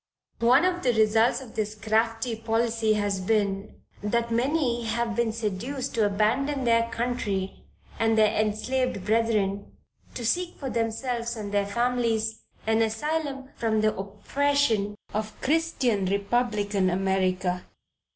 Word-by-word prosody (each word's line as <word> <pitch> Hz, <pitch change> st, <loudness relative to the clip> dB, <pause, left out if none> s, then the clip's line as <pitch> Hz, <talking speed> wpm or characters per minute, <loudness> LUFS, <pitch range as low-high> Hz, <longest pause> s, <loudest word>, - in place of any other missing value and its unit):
One 250 Hz, +8 st, +5 dB
of 360 Hz, -1 st, 0 dB
the 250 Hz, -2 st, +2 dB
results 220 Hz, +3 st, +3 dB
of 245 Hz, -4 st, -11 dB
this 215 Hz, 0 st, -2 dB
crafty 225 Hz, +2 st, 0 dB
policy 225 Hz, 0 st, +1 dB
has 205 Hz, -2 st, 0 dB
been, 200 Hz, 0 st, -1 dB, 0.2 s
that 235 Hz, +3 st, 0 dB
many 245 Hz, 0 st, +1 dB
have 230 Hz, 0 st, -1 dB
been 235 Hz, -1 st, +1 dB
seduced 230 Hz, +5 st, -3 dB
to 220 Hz, -3 st, +3 dB
abandon 255 Hz, +8 st, +1 dB
their 230 Hz, -1 st, +3 dB
country 225 Hz, -5 st, -3 dB, 0.3 s
and 225 Hz, 0 st, +2 dB
their 215 Hz, -1 st, +4 dB
enslaved 215 Hz, 0 st, 0 dB
brethren, 210 Hz, -3 st, 0 dB, 0.4 s
to 240 Hz, -, -4 dB
seek 355 Hz, +9 st, 0 dB
for 270 Hz, -3 st, -4 dB
themselves 235 Hz, +1 st, -2 dB
and 210 Hz, -2 st, -5 dB
their 200 Hz, -1 st, +1 dB
families 230 Hz, -1 st, 0 dB, 0.2 s
an 220 Hz, 0 st, +2 dB
asylum 270 Hz, +4 st, -2 dB
from 220 Hz, -2 st, +1 dB
the 215 Hz, 0 st, +2 dB
oppression 210 Hz, +2 st, 0 dB, 0.2 s
of 215 Hz, +1 st, -4 dB
Christian, 270 Hz, -, +1 dB
Republican, 205 Hz, -1 st, +1 dB
America. 185 Hz, -1 st, 0 dB
225 Hz, 130 wpm, -26 LUFS, 210-245 Hz, 0.4 s, One